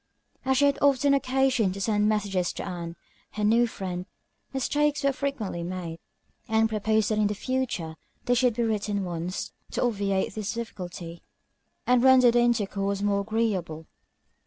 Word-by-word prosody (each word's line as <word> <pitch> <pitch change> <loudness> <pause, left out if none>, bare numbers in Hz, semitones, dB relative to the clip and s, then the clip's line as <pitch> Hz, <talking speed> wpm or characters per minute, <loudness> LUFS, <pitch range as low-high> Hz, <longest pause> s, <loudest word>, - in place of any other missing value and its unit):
As 265 0 +2
she 285 - +5
had 280 0 +2
often 280 0 +4
occasion 265 -6 +2
to 200 - -7
send 210 +1 +2
messages 195 -4 0
to - - -5
Ann, 170 -2 -5 0.4
her 210 - -3
new 230 +3 +4
friend, 185 -4 -5 0.4
mistakes 290 +2 0
were 275 0 +3
frequently 255 -10 -3
made; 170 -2 -5 0.5
Ann 220 0 +3
proposed 220 0 +1
that 215 - +1
in 210 -1 +2
future 220 -10 -2 0.3
they 245 - +3
should 245 -2 +3
be 240 - 0
written 210 -2 -1
ones, 175 0 -4 0.2
to - - -1
obviate 200 -5 0
this 215 -1 -3
difficulty, 180 -7 -7 0.6
and 250 -1 +4
render 255 -1 +7
their 240 0 +3
intercourse 200 -4 0
more 200 -1 +2
agreeable. 200 -7 -2
215 Hz, 155 wpm, -27 LUFS, 190-245 Hz, 0.6 s, render